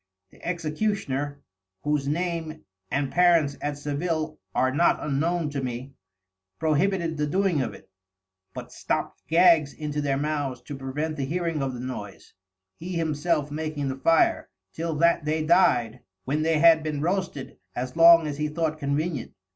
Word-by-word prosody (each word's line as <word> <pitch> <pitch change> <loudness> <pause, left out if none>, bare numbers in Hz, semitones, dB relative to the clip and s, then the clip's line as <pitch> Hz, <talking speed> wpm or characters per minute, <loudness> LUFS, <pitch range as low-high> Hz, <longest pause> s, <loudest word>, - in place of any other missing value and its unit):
The - - -20
Executioner 155 -5 -2 0.4
(whose 150 -2 0
Name 160 0 -2 0.3
and 140 -1 -1
Parents 170 -5 +4
at 145 0 -3
Sevil 155 +2 -3 0.2
are 130 0 +2
not 170 +5 +3
unknown 155 +2 -1
to 140 -1 -3
me) 125 +2 -5 0.6
prohibited 165 +1 +1
the 150 0 0
doing 185 -2 +1
of - - -3
it; - - -16 0.7
but - - -8
stopt - - -3
Gags 165 -4 +5
into 150 -1 -3
their 140 -2 0
Mouths 145 -3 -2
to 145 - -7
prevent 145 +4 -4
the 135 - -1
hearing 165 0 -2
of 135 -2 -2
the - - -7
noise 120 -6 -7 0.4
(he 180 +3 -6
himself 155 -2 0
making 150 -2 -3
the 130 - -3
Fire) 165 +5 +2 0.2
till 165 -1 -3
that 170 0 +3
they 155 +1 -1
dyed, 125 -9 +3 0.3
when 145 +4 0
they 160 0 +2
had 165 0 +6
been 155 -2 -3
roasted 175 -5 -3 0.2
as 125 +1 -4
long 165 0 +8
as 145 -2 -4
he 150 +1 -1
thought 155 0 -2
convenient. 145 -1 -2
155 Hz, 155 wpm, -26 LUFS, 140-165 Hz, 0.7 s, long